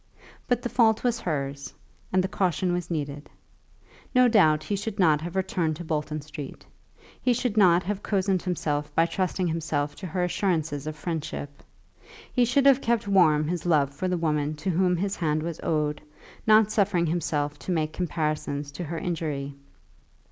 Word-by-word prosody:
But 245 -1 +1
the - - 0
fault 220 -3 +3
was 240 -2 +1
hers, 140 -6 -4 0.4
and 185 0 +3
the - - 0
caution 185 -3 0
was 175 -1 -3
needed. 145 -3 -4 0.9
No 250 0 +6
doubt 160 -10 +4
he 205 - -2
should 205 +1 -4
not 155 -5 +4
have 175 +3 -6
returned 180 -4 0
to 175 - -7
Bolton 155 -1 -2
Street. 150 -1 -9 0.6
He 250 - +3
should 240 -2 -1
not 180 -4 +5
have 205 +1 -3
cozened 190 -2 0
himself 150 -5 -2
by 165 - +5
trusting 185 +1 -1
himself 155 -3 -1
to 190 - -6
her 180 +1 -1
assurances 160 -6 -1
of 155 - -4
friendship; 155 -3 -5 0.7
he 250 -2 +4
should 265 +4 +2
have 275 -1 +6
kept 230 -3 0
warm 155 -6 +4
his 170 0 -2
love 145 -4 +3
for 185 +6 -3
the 180 -1 0
woman 150 -2 0
to 155 +5 -2
whom 180 +1 +2
his 200 +3 -2
hand 155 -2 0
was 165 -1 -4
owed, 150 -2 -1 0.5
not 215 0 +6
suffering 200 -5 +2
himself 150 -3 -1
to - - -5
make 155 -2 0
comparisons 155 -4 -2
to 160 +5 -6
her 165 +2 -4
injury. 155 -5 -3
170 Hz, 175 wpm, -26 LUFS, 150-190 Hz, 0.9 s, No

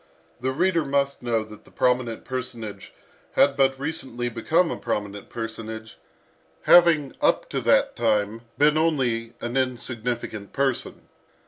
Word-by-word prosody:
The 130 +2 -1
reader 170 +3 +2
must 140 0 0
know 115 -2 0
that 110 -1 -13
the - - -19
prominent 125 -2 0
personage 120 -4 -5 0.4
had 140 0 +4
but 135 -1 +2
recently 135 -5 -3
become 160 +9 +1
a - - -2
prominent 100 -3 -4
personage, 110 -1 -6 0.6
having 165 -5 +6
up - - +2
to - - -1
that - - +3
time 105 +2 0 0.2
been 150 +1 +4
only 120 -8 0
an 120 +1 -4
insignificant 120 -4 -2
person. 135 -3 -2
125 Hz, 130 wpm, -24 LUFS, 115-140 Hz, 0.6 s, having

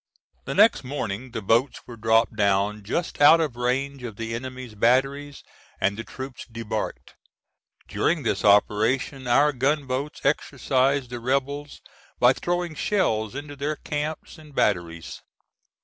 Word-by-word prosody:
The - - -4
next 225 - +5
morning 125 -3 -4
the 115 -3 -6
boats 115 +7 +1
were 120 - -9
dropped 115 0 +2
down 100 0 +1
just 145 - -3
out 155 +3 +8
of 150 -7 -1
range 130 +3 -1
of 120 -4 -7
the 115 +1 -5
enemy's 130 0 -6
batteries 135 +6 +1 0.4
and 100 +2 +1
the 115 - -6
troops 130 +1 -8
debarked. 115 -1 -5 0.7
During 160 -2 0
this - - -1
operation 115 +6 +2
our 145 +5 +4
gun 140 +3 0
boats 135 +3 -4
exercised 135 -2 +1
the 120 - -4
rebels 140 +4 -2 0.4
by 125 +1 +6
throwing 175 +2 -2
shells 125 - 0
into 145 +1 -7
their 145 +2 -2
camps 150 +2 -5
and 150 -3 -15
batteries. 85 -4 -1
130 Hz, 140 wpm, -25 LUFS, 115-145 Hz, 0.7 s, out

